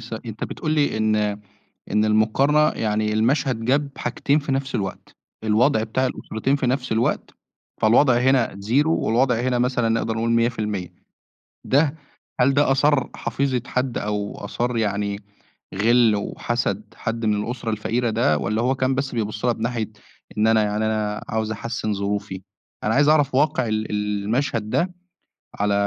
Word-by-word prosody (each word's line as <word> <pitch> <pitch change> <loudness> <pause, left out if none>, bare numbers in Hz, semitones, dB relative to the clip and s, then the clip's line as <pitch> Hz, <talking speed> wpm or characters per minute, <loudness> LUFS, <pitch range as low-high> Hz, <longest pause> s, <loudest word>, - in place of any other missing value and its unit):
ث 115 0 -11
أنت 110 -1 -5
بتقول 155 - -4
لي 145 -7 +1
إن 110 0 +2 0.7
إن 105 +2 +2
المقارنة 135 +8 +3
يعني 105 -1 0
المشهد 115 +1 +1
جاب 140 +3 +2
حاجتين 140 +4 0
في 140 -1 -3
نَفْس 135 0 -2
الوقت. 100 -4 -4 0.3
الوضع 110 +2 +3
بتاع 120 +4 0
الأسرتين 130 +2 -2
في 135 - -2
نَفْس 130 0 -1
الوقت، 115 +2 0 0.5
فالوضع 120 +4 +5
هنا 130 -1 +3 0.2
Zero 135 +8 +2
والوضع 125 -5 +2
هنا 125 -1 0
مثلًا 125 -1 +1
نقدر 115 0 0
نقول 115 +1 -1
100%. 105 -6 -1 0.7
ده 145 +2 +2 0.4
هل 135 +2 +4
ده 145 -1 +3
أثار 140 -1 +2
حفيظة 125 +1 -1
حد 125 -1 -1
أو 105 -1 -3
أثار 120 0 -2
يعني 100 -2 -1 0.6
غِل 115 +1 +4
وحَسَد 105 0 -2
حد 115 0 -3
من 105 -1 +1
الأسرة 120 -1 -4
الفقيرة 115 +3 -1
ده 110 -9 +2
والّا 110 +10 -1
هو 130 +2 +1
كان 130 0 0
بس 140 0 -2
بيبُص 110 0 -2
لها 120 - +3
بناحية 115 -1 -3 0.5
إن 110 +1 +3
أنا 110 -1 +4
يعني 105 +1 -1
أنا 105 -1 -1
عاوز 110 0 -1
أحسّن 110 -1 -3
ظروفي؟ 100 -1 -3 0.4
أنا 110 - +1
عايز 145 +2 +4
أعرف 145 -4 +3
واقع 145 -3 +2
ال 110 0 -2
المشهد 105 +4 -1
ده 180 +9 0 0.7
على 105 0 +2
115 Hz, 155 wpm, -22 LUFS, 110-130 Hz, 0.7 s, فالوضع